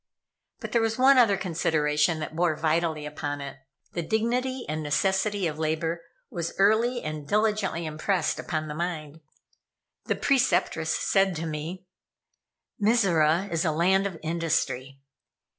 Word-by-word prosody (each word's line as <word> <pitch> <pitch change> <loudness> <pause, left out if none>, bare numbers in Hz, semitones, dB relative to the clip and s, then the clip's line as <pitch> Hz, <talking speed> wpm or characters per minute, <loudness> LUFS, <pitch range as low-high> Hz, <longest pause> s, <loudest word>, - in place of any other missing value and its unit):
But - - -6
there 235 - +2
was 225 0 0
one 265 +1 +6
other 210 -5 +4
consideration 160 -3 +1
that 155 - -5
bore 170 -1 +1
vitally 160 0 0
upon 145 -1 -4
it. 140 -1 -7 0.4
The 175 - -2
dignity 245 +7 -1
and 155 +1 -3
necessity 190 +6 0
of 155 -2 -3
labor 160 +2 -1 0.3
was 170 -1 -4
early 225 +5 +3
and 155 -1 -5
diligently 210 -5 0
impressed 155 +5 -1
upon 155 -2 -3
the 150 - -5
mind. 160 -2 -4 0.8
The - - 0
Preceptress 230 - +1
said 195 -2 +2
to 160 +1 -4
me: 160 +4 -5 1.0
"Mizora 190 -6 +3
is 165 -1 0
a 165 - +1
land 190 +5 +2
of 185 -4 -8
industry. 155 -5 -1
170 Hz, 140 wpm, -26 LUFS, 155-200 Hz, 1.0 s, one